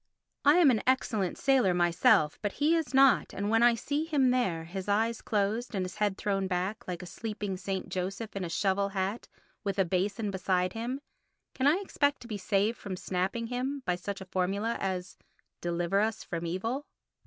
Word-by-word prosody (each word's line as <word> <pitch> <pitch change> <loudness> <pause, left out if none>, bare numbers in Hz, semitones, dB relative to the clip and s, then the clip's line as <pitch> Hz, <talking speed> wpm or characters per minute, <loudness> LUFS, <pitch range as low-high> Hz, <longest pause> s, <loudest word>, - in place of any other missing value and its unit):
I 290 +2 +6
am 340 -6 +6
an 220 - +1
excellent 220 -7 +1
sailor 255 -10 +3
myself, 175 - +3
but 205 -2 -2
he 305 +3 +2
is 325 -3 -1
not, 270 -2 +4
and 200 +2 -1
when 225 0 +4
I 240 0 +6
see 285 +6 -2
him 280 -6 +3
there, 190 -11 0
his 185 +3 -6
eyes 225 +3 +1
closed 215 +3 -1
and 185 -1 0
his 185 +3 -8
head 205 -2 0
thrown 195 -2 -1
back, 185 +4 -2
like 180 -1 -4
a - - -7
sleeping 210 0 -4
St. 190 0 -4
Joseph 195 +4 -4
in 195 - -2
a 175 - -3
shovel 200 +3 +1
hat, 195 +3 -2 0.4
with 200 -2 -2
a 195 - +3
basin 195 +4 -1
beside 185 -1 0
him, 245 +5 -3 0.5
can 265 +1 +1
I 295 - +6
expect 285 -7 0
to - - -11
be 210 -3 -4
saved 205 +4 +1
from 195 -2 -5
snapping 190 +6 -2
him 255 +3 -3
by 180 - +1
such 190 +2 -5
a - - -7
formula 195 +5 -1
as 185 -2 -3 0.4
"Deliver 175 +2 0
us 215 +1 0
from 170 0 -4
evil"? 225 - -3
200 Hz, 195 wpm, -30 LUFS, 185-240 Hz, 0.5 s, I